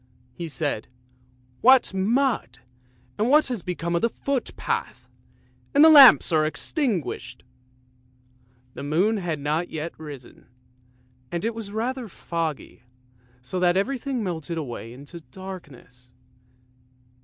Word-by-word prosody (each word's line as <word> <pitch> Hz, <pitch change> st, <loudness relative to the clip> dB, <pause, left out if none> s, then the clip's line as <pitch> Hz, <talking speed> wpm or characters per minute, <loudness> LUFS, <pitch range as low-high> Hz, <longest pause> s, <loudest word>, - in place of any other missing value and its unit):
he 170 Hz, +5 st, -6 dB
said; 145 Hz, -6 st, -3 dB, 0.7 s
"what 255 Hz, -3 st, +5 dB
mud; 210 Hz, -, 0 dB, 0.6 s
and 220 Hz, +3 st, +1 dB
what 300 Hz, +3 st, +5 dB
has 240 Hz, -6 st, -3 dB
become 170 Hz, -1 st, -3 dB
of 170 Hz, -, +1 dB
the 230 Hz, -, +2 dB
footpath? 275 Hz, +1 st, -3 dB, 0.7 s
And 290 Hz, -, +7 dB
the 320 Hz, -, +8 dB
lamps 275 Hz, -, +9 dB
are 155 Hz, -2 st, +3 dB
extinguished! 180 Hz, -, -2 dB, 0.7 s
" 125 Hz, 0 st, -36 dB
The -, -, -8 dB
moon 175 Hz, +10 st, +1 dB
had 170 Hz, -6 st, -3 dB
not 155 Hz, +4 st, -1 dB
yet 160 Hz, +1 st, -5 dB
risen, 145 Hz, -5 st, -11 dB, 0.8 s
and 170 Hz, +3 st, -3 dB
it 230 Hz, -, -1 dB
was 220 Hz, -3 st, -7 dB
rather 240 Hz, +3 st, -3 dB
foggy, 165 Hz, -, -5 dB, 0.6 s
so 180 Hz, +9 st, -4 dB
that 180 Hz, 0 st, +3 dB
everything 260 Hz, +3 st, -2 dB
melted 170 Hz, -3 st, -4 dB
away 120 Hz, -6 st, -6 dB
into 140 Hz, +7 st, -11 dB
darkness. 140 Hz, -6 st, -12 dB
170 Hz, 120 wpm, -24 LUFS, 145-225 Hz, 0.8 s, lamps